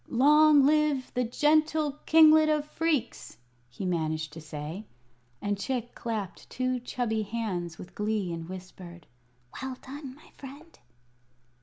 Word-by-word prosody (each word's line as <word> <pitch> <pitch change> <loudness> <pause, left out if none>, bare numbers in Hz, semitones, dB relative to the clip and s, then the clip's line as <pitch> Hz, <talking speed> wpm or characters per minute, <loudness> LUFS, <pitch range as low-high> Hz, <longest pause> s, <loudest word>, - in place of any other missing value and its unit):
"Long 295 +3 +5
live 300 -3 +1
the 250 - 0
gentle 300 +3 +1
Kinglet 315 -1 +7
of 300 -1 +1
Phreex," 300 -5 -2 0.3
he 125 +10 -7
managed 155 -3 -2
to 160 - -9
say. 155 +6 -7 0.6
And 205 -1 -1
Chick 240 +1 -3
clapped 215 -5 -5
two 255 0 -1
chubby 235 -2 -2
hands 195 -7 -4
with 180 - -11
glee, 210 -4 -2
and 165 0 -7
whispered: 180 -2 -10 0.6
"Well 265 -1 -4
done, 270 -1 -8
my 300 - -19
friend!" 285 +5 -13
245 Hz, 130 wpm, -28 LUFS, 185-295 Hz, 0.6 s, Kinglet